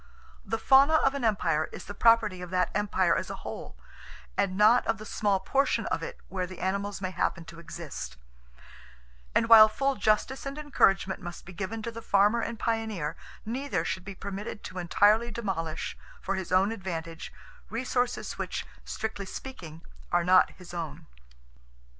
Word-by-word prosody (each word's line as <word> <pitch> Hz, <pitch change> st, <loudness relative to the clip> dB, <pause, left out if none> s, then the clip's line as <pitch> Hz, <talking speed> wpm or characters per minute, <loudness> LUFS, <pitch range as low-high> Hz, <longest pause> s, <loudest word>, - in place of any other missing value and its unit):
The 225 Hz, -, -2 dB
fauna 275 Hz, +6 st, +6 dB
of 275 Hz, -3 st, +3 dB
an 280 Hz, -2 st, -4 dB
empire 175 Hz, -8 st, +2 dB
is -, -, -9 dB
the 205 Hz, -, -7 dB
property 220 Hz, -5 st, +4 dB
of 180 Hz, -, -6 dB
that 180 Hz, -1 st, +1 dB
empire 205 Hz, 0 st, +2 dB
as -, -, -2 dB
a -, -, -4 dB
whole, -, -, -7 dB, 0.6 s
and 190 Hz, -2 st, 0 dB
not 220 Hz, +4 st, +6 dB
of 225 Hz, -, +1 dB
the 215 Hz, -, -9 dB
small 205 Hz, -2 st, +1 dB
portion 270 Hz, +9 st, +1 dB
of -, -, -1 dB
it 485 Hz, -, -6 dB
where 185 Hz, -2 st, -3 dB
the 185 Hz, 0 st, -10 dB
animals 200 Hz, +2 st, -2 dB
may 185 Hz, -1 st, -2 dB
happen 170 Hz, -2 st, -1 dB
to 165 Hz, -, -11 dB
exist; 160 Hz, -, -7 dB, 1.2 s
and -, -, +3 dB
while 220 Hz, -1 st, +10 dB
full 275 Hz, +5 st, 0 dB
justice 215 Hz, +7 st, +1 dB
and 275 Hz, +1 st, -5 dB
encouragement 195 Hz, -11 st, +2 dB
must 175 Hz, -1 st, -8 dB
be 190 Hz, -, -10 dB
given 210 Hz, +5 st, -4 dB
to 235 Hz, -, -3 dB
the 230 Hz, 0 st, -8 dB
farmer 205 Hz, +3 st, +3 dB
and 235 Hz, -, -4 dB
pioneer, 220 Hz, -9 st, -2 dB, 0.3 s
neither 225 Hz, -7 st, -2 dB
should 185 Hz, -, -3 dB
be 195 Hz, +1 st, -8 dB
permitted 200 Hz, +3 st, -6 dB
to 185 Hz, -, -6 dB
entirely 210 Hz, +6 st, +3 dB
demolish 190 Hz, -8 st, -3 dB, 0.2 s
for -, -, -2 dB
his 190 Hz, -2 st, -4 dB
own 190 Hz, +3 st, +4 dB
advantage 165 Hz, -6 st, -5 dB, 0.4 s
resources 245 Hz, +1 st, -2 dB
which, -, -, -3 dB, 0.2 s
strictly 220 Hz, -3 st, -4 dB
speaking, 170 Hz, -11 st, -8 dB, 0.3 s
are 175 Hz, 0 st, +3 dB
not 185 Hz, +1 st, +5 dB
his 180 Hz, -1 st, -12 dB
own." 160 Hz, -2 st, -5 dB
200 Hz, 170 wpm, -28 LUFS, 180-230 Hz, 1.2 s, while